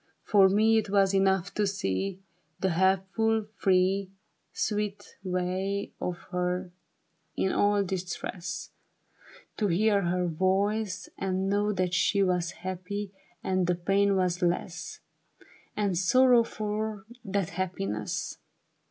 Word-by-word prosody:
For 195 -2 +5
me 220 +3 +4
it 210 - -4
was 195 -1 +3
enough 195 -1 +2
to 210 -1 +1
see 195 - -2 0.4
The 190 - +1
helpful, 195 +5 +2
free, 190 0 +2 0.4
Sweet 205 -1 -3
way 185 +2 -2
of 180 -1 -2
her 180 0 -1 0.7
in 190 - +1
all 205 0 +3
distress; 180 -1 -5 0.9
To 210 - +1
hear 200 +3 +3
her 180 0 0
voice, 195 +4 0
and 190 0 -1
know 205 +1 +1
that 180 -2 -1
she 200 +2 +3
Was 180 -2 +1 0.2
happy, 190 +2 -4 0.3
and 185 -2 +1
that 175 -1 -1
pain 200 0 +3
was 180 -1 0
less. 175 0 -2 0.8
And 200 -3 +1
sorrow, 245 +7 +5
for 215 -2 -4 0.2
that 195 -3 -1
happiness. 105 - -3
190 Hz, 115 wpm, -28 LUFS, 180-205 Hz, 0.9 s, For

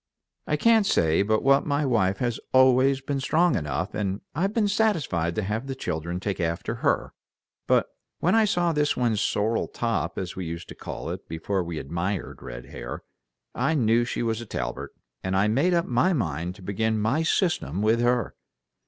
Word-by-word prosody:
I - - +1
can't 225 -3 +4
say 80 - +3
but 110 +2 +1
what 135 +1 +5
my 145 0 +1
wife 100 -7 +2
has 120 0 -1
always 130 +1 +5
been 135 +1 -2
strong 160 +3 +2
enough, 80 +5 -2
and 100 -1 -2
I've 185 +7 0
been 215 -1 +1
satisfied 155 - +1
to 110 - -1
have 110 +6 -3
the 135 - -4
children 85 -5 -3
take 100 +1 -3
after 85 0 -1
her; - - +1 0.5
but - - +4 0.3
when 175 - +1
I 225 -1 +5
saw 175 -4 +1
this 150 -1 +1
one's 115 -4 +1
sorrel 110 +2 0
top 110 -8 -2
as 90 -2 -4
we 95 - -4
used 85 +1 -6
to - - -7
call - - -6
it - - -7
before 90 +4 -2
we 85 -2 -5
admired 85 +7 -3
red - - -8
hair, - - -7 0.5
I 160 - +1
knew 115 -3 +3
she 120 - -2
was 115 0 -1
a 120 - -9
Talbert, - - -4 0.3
and 95 0 0
I 100 +2 +3
made 145 +12 +2
up 170 - +2
my 130 +10 +2
mind 85 - -2
to 95 - -14
begin 110 +3 0
my 115 +9 +1
system 160 - 0
with 110 +2 +3
her." 120 -2 +1
110 Hz, 190 wpm, -26 LUFS, 90-140 Hz, 0.5 s, what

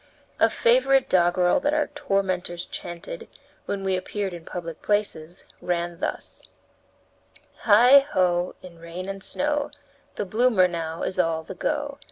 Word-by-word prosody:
A - - +5
favorite 470 - +3
doggerel 175 0 +3
that 290 +2 0
our 305 - +2
tormentors 190 -10 -1
chanted, 460 - -7 0.4
when 195 -1 -3
we 190 -1 +1
appeared 190 +1 -3
in 170 -2 -9
public 165 -3 -7
places, 195 -5 -2 0.2
ran 175 -1 -2
thus: - - -4 1.2
"Heigh! 240 +6 +8
ho! 180 -11 0
in 170 -2 -12
rain 170 +3 -7
and 195 -1 -5
snow, 295 0 -1 0.5
The 210 - -3
bloomer 215 -2 +3
now 165 -2 -4
is 185 - -3
all 165 -2 +1
the 190 - -8
go. 285 +7 -3
185 Hz, 140 wpm, -25 LUFS, 175-255 Hz, 1.2 s, Heigh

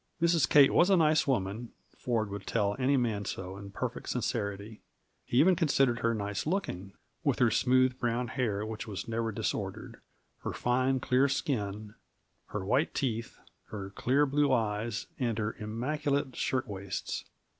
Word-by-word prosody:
Mrs. 170 -1 +3
Kate 140 -2 +7
was 180 - +5
a 195 - +5
nice 155 -2 +3
woman; 115 -2 -1 0.2
Ford 110 -4 -1
would 100 -1 -6
tell 100 -3 +1
any 135 +2 +3
man 110 -5 0
so 95 -1 -5
in 100 0 -9
perfect 100 - -4
sincerity. 100 +2 -3 0.4
He 120 - -1
even 180 +5 +6
considered 135 -7 +2
her 115 0 +1
nice 105 +3 -3
looking, 100 - -2 0.3
with 140 -6 +2
her 120 -3 +4
smooth, 130 +2 +3
brown 120 0 -1
hair 110 -6 -1
which 110 0 -6
was 105 0 -5
never 115 0 -1
disordered, 100 - -4 0.4
her - - -4
fine, 130 +1 +1
clear 130 +2 +3
skin, 105 -6 -2 0.5
her 100 -2 -4
white 130 - +1
teeth, 115 -5 -2 0.3
her 100 -2 -6
clear 135 +8 +2
blue 145 0 +2
eyes, 110 -2 0
and 120 -4 0
her 110 0 -2
immaculate 140 +5 -1
shirt 130 -1 -1
waists. 100 -2 -4
115 Hz, 155 wpm, -30 LUFS, 105-135 Hz, 0.5 s, Kate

